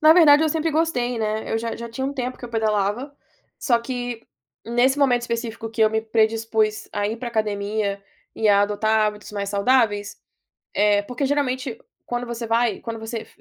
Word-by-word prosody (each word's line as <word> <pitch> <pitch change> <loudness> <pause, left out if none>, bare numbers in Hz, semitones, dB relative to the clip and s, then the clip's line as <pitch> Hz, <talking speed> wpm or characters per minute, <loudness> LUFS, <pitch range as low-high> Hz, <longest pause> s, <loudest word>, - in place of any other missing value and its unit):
Na 310 0 +8
verdade 315 -3 +7
eu 315 - +3
sempre 320 +1 0
gostei, 255 -7 0
né, 215 0 -2
eu - - +2
já 230 0 -4
já 235 0 -7
tinha 265 +4 -3
um 275 - -2
tempo 255 -2 -3
que - - -9
eu - - -6
pedalava, 220 +4 -1 0.4
só 240 -6 +2
que 245 -1 -5 0.4
nesse 245 +4 +2
momento 250 -4 +3
específico 230 -1 -4
que 225 - -6
eu 215 - +5
me 220 0 +1
predispus 220 -1 +1
a 205 0 0
ir 220 +2 -3
para 240 +1 -5
academia 205 -2 -1 0.3
e 220 - +1
a 200 0 +5
adotar 215 +1 +2
hábitos 210 0 -5
mais 200 -1 -3
saudáveis, 205 -1 +2 0.6
eh, 205 0 +3
porque 250 +6 -4
geralmente 260 -4 -1 0.3
quando 245 0 -3
você 235 0 -5
vai 230 -1 +1
quando 225 -1 -6
você 225 0 -5
230 Hz, 190 wpm, -23 LUFS, 215-250 Hz, 0.6 s, Na